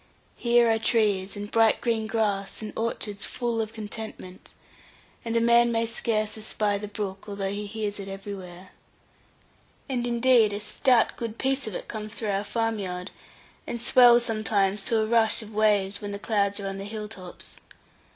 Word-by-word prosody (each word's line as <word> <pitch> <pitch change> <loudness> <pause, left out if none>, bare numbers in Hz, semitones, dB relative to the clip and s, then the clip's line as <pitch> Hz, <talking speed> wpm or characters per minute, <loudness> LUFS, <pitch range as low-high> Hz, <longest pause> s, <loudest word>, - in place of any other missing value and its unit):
Here 240 0 +3
are 225 - +1
trees, 205 -5 +1
and 205 0 -6
bright 225 -1 +4
green 225 -2 -1
grass, 205 -3 -1
and 215 - -6
orchards 215 -3 -3
full 235 -2 -2
of 220 -1 -4
contentment, 215 -4 -8 0.7
and 230 -1 -1
a - - +5
man 235 +1 +5
may 230 0 +1
scarce 215 -2 0
espy 210 -1 -1
the 210 - -6
brook, 200 -2 -5
although 200 -1 -3
he 205 +1 -4
hears 210 -1 -4
it 195 - -6
everywhere. 195 -2 -8 1.2
And 245 -3 -1
indeed 235 -3 +4
a 205 - -3
stout 230 +3 +2
good 230 -1 -5
piece 270 -1 0
of 210 - -5
it - - -6
comes 215 0 -6
through 215 -3 -2
our 195 +1 -1
farm 225 0 -1
yard, 180 -1 -5 0.6
and 235 - -4
swells 240 0 +6
sometimes 210 -3 +1
to 230 - +1
a - - +1
rush 225 0 +3
of 215 0 -12
waves, 205 -2 +2
when 205 -1 -5
the - - -3
clouds 200 -1 0
are 200 - -4
on 195 0 -5
the 195 - -6
hill 210 0 -5
tops. 185 -4 -11
215 Hz, 180 wpm, -26 LUFS, 200-230 Hz, 1.2 s, swells